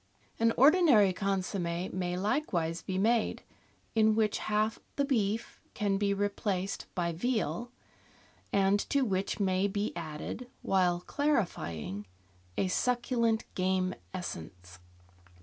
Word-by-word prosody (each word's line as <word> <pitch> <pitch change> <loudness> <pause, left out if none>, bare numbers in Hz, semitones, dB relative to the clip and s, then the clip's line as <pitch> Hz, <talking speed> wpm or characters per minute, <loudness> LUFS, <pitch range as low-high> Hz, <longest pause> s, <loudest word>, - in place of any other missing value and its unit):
An 230 0 +4
ordinary 275 - +6
consomm^ 185 -2 -2
may 180 -1 -2
likewise 180 - 0
be 185 - -3
made, 225 +3 +1 0.5
in 220 -1 +4
which 215 -1 +1
half 215 +1 0 0.2
the 280 - +1
beef 225 -5 -1
can 200 -2 +1
be 200 -1 +2
replaced 200 -1 -1
by 170 -1 0
veal, 240 +5 -1 0.8
and 195 0 +3
to 280 -1 +3
which 195 -2 -1
may 190 0 +2
be 205 0 -2
added, 170 +9 -6
while 180 -2 +2
clarifying, 105 - -1 0.5
a 190 - +2
suc 245 +6 +1
culent 230 -3 +1
game 185 0 +1 0.2
essence. 90 - -7
200 Hz, 115 wpm, -31 LUFS, 180-225 Hz, 0.8 s, ordinary